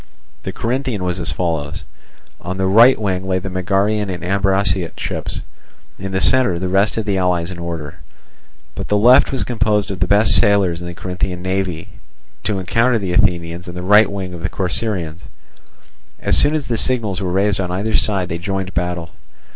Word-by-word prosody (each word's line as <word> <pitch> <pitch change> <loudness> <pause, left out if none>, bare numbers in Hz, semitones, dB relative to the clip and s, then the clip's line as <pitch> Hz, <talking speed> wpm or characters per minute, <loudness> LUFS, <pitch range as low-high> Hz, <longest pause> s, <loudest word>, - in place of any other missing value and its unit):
The - - -5
Corinthian 120 -4 -2
was 90 0 -2
as 85 - -1
follows: 80 -3 -3 0.6
on 95 +1 -5
the 95 - 0
right 115 +7 +6
wing 95 -3 -2
lay 95 -1 +1
the 95 +1 -5
Megarian 100 +3 0
and 90 -1 -5
Ambraciot 95 -2 0
ships, - - -4 0.6
in 95 0 -5
the 95 - 0
centre 125 -4 +3
the 90 +2 -3
rest 100 +4 +2
of 110 - -1
the 100 -3 0
allies 90 -1 0
in 90 - -8
order. 85 -4 -6 0.7
But 95 - -6
the 105 - +2
left 120 +5 +6
was 135 - -1
composed 105 -4 0
of 95 - -5
the 90 - +1
best 100 +2 +4
sailers 100 -4 +3
in 85 - -6
the 85 - -7
Corinthian 90 0 -4
navy, 95 -3 -2 0.6
to 105 -3 0
encounter 115 +6 +1
the 95 -4 -3
Athenians 85 -3 0
and 90 0 -7
the 90 - -5
right 105 +2 +5
wing 95 -2 -5
of 85 - -8
the 95 - -2
Corcyraeans. 90 -4 -2 1.0
As - - +2
soon 145 +2 +5
as 150 -3 -2
the 115 -1 -2
signals 110 -7 0
were 90 -2 -2
raised 100 +2 +1
on 90 - -3
either 100 +5 -2
side, 95 -4 +1
they 85 - -3
joined 95 +1 -3
battle. 90 -2 -3
95 Hz, 190 wpm, -18 LUFS, 90-105 Hz, 1.0 s, right